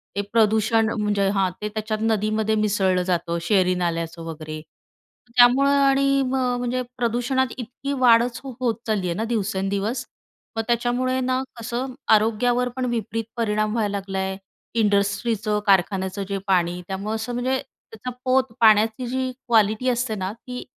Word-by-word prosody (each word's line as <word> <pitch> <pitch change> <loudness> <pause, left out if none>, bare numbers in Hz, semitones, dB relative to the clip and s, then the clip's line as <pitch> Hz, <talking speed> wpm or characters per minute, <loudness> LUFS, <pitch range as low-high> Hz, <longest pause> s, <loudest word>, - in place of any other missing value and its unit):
ते 200 - 0
प्रदूषण 220 0 +3
म्हणजे 205 -1 +1
हां, 195 -2 +2
ते 210 - -2
त्याच्यात 215 0 -3
नदीमध्ये 220 0 +1
मिसळलं 195 -4 +1
जातं, 170 -2 -1
शहरी 185 +1 +2
नाल्याचं 170 -1 -2
वगैरे, 155 -1 -6 0.8
त्यामुळे 255 +3 +6
आणि 275 0 +3
मग 255 -1 0
म्हणजे 245 +1 -1 0.2
प्रदूषणात 245 +2 +1
इतकी 265 +3 -5
वाढच 235 -1 +4
हो 270 - -6
होत 235 -3 +1
चालली 205 -4 0
आहे 170 - -2
ना, 220 - -2
दिवसेंदिवस. 200 +3 -1 0.5
मग 225 - 0
त्याच्यामुळे 245 +2 0
ना, 255 0 0 0.2
कसं, 245 +3 -4 0.2
आरोग्यावर 240 +3 +1
पण 255 - 0
विपरीत 225 0 -2
परिणाम 215 -1 0
व्हायला 210 -3 0
लागला 195 -1 -4
आहे. 190 0 -2 0.4
इंडस्ट्रीचं, 210 +1 +1
कारखान्याचं 190 0 +2
जे 200 - -1
पाणी, 180 -2 +1
त्यामुळं 200 +3 -3
असं, 220 +2 -4
म्हणजे 255 +2 0
त्याचा 225 +3 -10
पोत, 255 -2 +2
पाण्याची 220 +2 +4
जी 260 +1 -2 0.2
क्वालिटी 220 +1 +3
असते 240 -2 0
ना, 190 0 -3
ती 250 +2 -8
220 Hz, 145 wpm, -23 LUFS, 200-245 Hz, 0.8 s, त्यामुळे